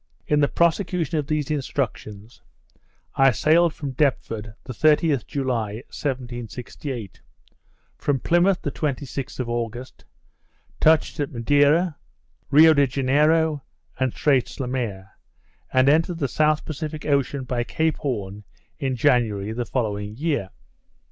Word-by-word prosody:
In 150 - +2
the 145 - +4
prosecution 170 -1 0
of 145 - -4
these 155 -2 -1
instructions, 120 -6 -4 0.7
I 135 0 +5
sailed 160 +7 +3
from 140 -2 -5
Deptford 115 -6 -1
the 130 - -7
30th 150 0 +2
July, 125 -7 -2 0.2
1768; 125 - -5 0.8
from 140 -2 0
Plymouth 175 +5 +2
the - - -2
26th 140 -3 -4
of 125 - -2
August, 120 +1 -5 0.8
touched 160 0 +3
at 145 - -2
Madeira, 145 +7 +2 0.5
Rio 155 +3 +7
de 140 -2 +3
Janeiro, 150 +4 +2 0.4
and 130 -1 +1
Straits 135 0 0
Le 130 - -2
Maire, 105 -7 -4 0.6
and 130 +1 +3
entered 165 +4 +3
the 145 -4 -1
South 155 +3 +1
Pacific 155 0 -5
Ocean 140 -2 0
by 125 -1 -2
Cape 160 +5 -1
Horn 105 -7 -4 0.4
in 135 -4 -1
January 115 -6 +1
the 120 +1 -3
following 105 -4 -2
year. 145 - -1
135 Hz, 125 wpm, -23 LUFS, 120-155 Hz, 0.8 s, Rio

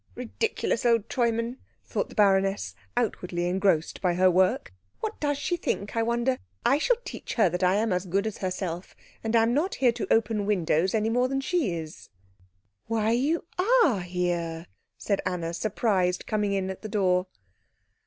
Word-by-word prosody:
"Ridiculous 250 - -2
old 230 -3 +2
Treumann," 235 0 0 0.3
thought - - -2
the - - -13
baroness, 195 -1 +2 0.2
outwardly 180 -7 -1
engrossed 180 -3 +1
by 180 -2 +1
her 185 +1 +5
work. 185 - +2 0.3
"What 440 - -4
does 290 -1 0
she 350 +5 -1
think, 205 -11 -3
I 230 - +2
wonder? 240 +3 0 0.3
I 270 +5 +4
shall - - +3
teach - - -6
her 215 -6 +4
that 180 +2 -3
I 185 +1 +3
am 215 -1 +1
as 180 +1 -2
good 195 +4 0
as 220 - -4
herself, 185 -2 -4 0.3
and 225 +1 0
am 230 +1 +4
not 325 +9 0
here 250 -3 +3
to 230 - -5
open 215 -2 +2
windows 185 -1 +1
any 220 +1 +1
more 250 +2 +2
than 270 +1 -1
she 270 - 0
is." 160 0 -8 0.8
"Why, 225 -1 +1
you 285 +9 +1 0.4
are 235 - +2
here," 175 -2 -2 0.3
said 200 -2 -1
Anna, 175 -2 -2
surprised, 190 -2 0
coming 210 -2 0
in 190 -1 -1
at 190 - -9
the 215 - -6
door. 185 -3 +1
205 Hz, 175 wpm, -27 LUFS, 180-235 Hz, 0.8 s, her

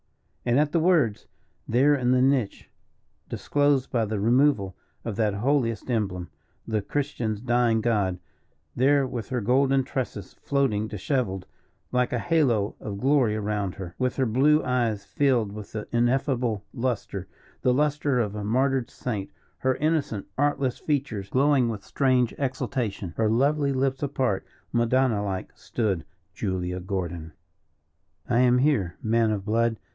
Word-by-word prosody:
And 120 +2 +2
at 150 0 +2
the 170 - +2
words, 155 - +2 0.4
there 135 +6 +4
in 125 -3 +1
the 125 0 +4
niche, 130 -6 +1 0.6
disclosed 145 -2 +1
by 115 -2 +1
the 105 -1 -2
removal 115 -4 +2 0.3
of 115 -3 -3
that 105 -3 +1
holiest 120 0 0
emblem, 95 -6 -2 0.4
the 110 -2 0
Christian's 120 -4 -2
dying 120 -1 +2
God 105 -6 +1 0.6
there 140 +2 +3
with 120 -3 -5
her 125 -2 -1
golden 135 +4 +3
tresses 125 -7 -4
floating 125 -7 0
disheveled 100 -3 -2 0.5
like 125 0 +1
a 125 - 0
halo 120 -8 +1
of 100 -2 -5
glory 130 -5 +3
round 105 -3 -2
her, 90 -3 -7
with 130 -1 0
her 135 - +1
blue 140 +7 +3
eyes 115 -5 0
filled 125 -7 +1
with 105 -1 -9
the 110 -1 -5
ineffable 120 -3 +1
lustre 115 -6 -3 0.3
the 125 - +3
lustre 145 -1 +1
of 105 -4 -1
a 105 -1 -4
martyred 130 +3 +1
saint, 105 -6 -4 0.3
her 130 0 +1
innocent, 150 -9 -1
artless 140 -3 +1
features 130 -10 -2
glowing 135 -1 +3
with 105 -4 -5
strange 130 0 +2
exultation, 125 -9 -2
her 110 -1 +2
lovely 140 +5 +2
lips 135 0 0
apart, 130 -8 0 0.3
madonna 120 -2 +2
like, 95 -2 -4
stood 100 -8 -2 0.3
Julia 90 -2 -2
Gordon. 85 -4 -4 0.9
"I 120 -1 +2
am 125 0 +5
here, 125 - +1
man 115 0 +2
of 100 -3 -2
blood. 115 +1 +1
120 Hz, 145 wpm, -26 LUFS, 105-135 Hz, 0.9 s, am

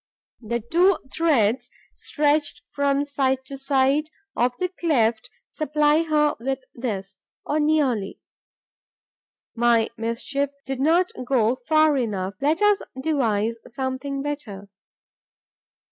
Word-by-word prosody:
The 235 +1 -2
two 345 - +3 0.2
threads 250 -7 +2 0.3
stretched 295 0 0
from 280 0 +1
side 265 -2 0
to 275 - -7
side 275 +2 +2 0.3
of 245 0 +1
the 365 - -1
cleft 245 -11 0 0.2
supply 300 0 +2
her 300 -2 +2
with 265 +2 -3
this, 205 -5 -5 0.3
or 300 - 0
nearly. 285 -10 +1 1.3
My 235 -1 +3
mischief 250 +5 -2 0.2
did 265 -1 -4
not 335 +6 +3 0.2
go 245 -2 +2
far 310 -1 +4
enough. 200 -6 -2
Let 310 +7 +1
us 415 -1 +4 0.2
devise 230 -7 0
something 265 +2 -3
better. 215 -10 -6
275 Hz, 110 wpm, -23 LUFS, 235-300 Hz, 1.3 s, far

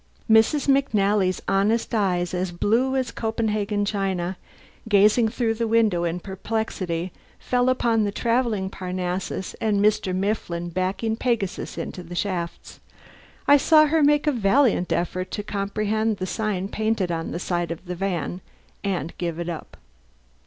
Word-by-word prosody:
Mrs. 225 +7 +4
McNally's 205 -9 +2
honest 210 +5 +1
eyes, 180 -5 +1
as 180 0 -1
blue 230 +9 +1
as 260 -3 -1
Copenhagen 215 -2 -1
china, 190 -3 -1 0.5
gazing 215 +3 +5
through 230 0 0
the 230 +1 -2
window 215 -6 +2
in 170 +1 -2
perplexity, 190 -3 -3 0.3
fell 250 0 +1
upon 235 -3 +2
the 205 - 0
travelling 230 -3 0
Parnassus 185 0 -4
and 215 -3 +1
Mr. 210 -2 +2
Mifflin 185 -3 -2
backing 185 +5 -1
Pegasus 230 -5 -2
into 180 - -5
the 175 0 -9
shafts. 175 -3 -4 0.7
I 285 - +8
saw 310 +2 +6
her 315 +1 +2
make 295 +1 +4
a 300 - +3
valiant 230 -4 +2
effort 185 +1 -1
to 205 - -4
comprehend 215 +2 -1
the 185 - -3
sign 195 -1 -2
painted 215 -5 0
on 165 -1 -3
the - - -4
side 175 -1 -2
of 165 +2 -6
the 180 - -4
van 180 -1 -3 0.4
and 175 -6 -2
give 170 -2 -2
it 170 0 -3
up. 165 -3 -7
200 Hz, 145 wpm, -24 LUFS, 180-225 Hz, 0.7 s, I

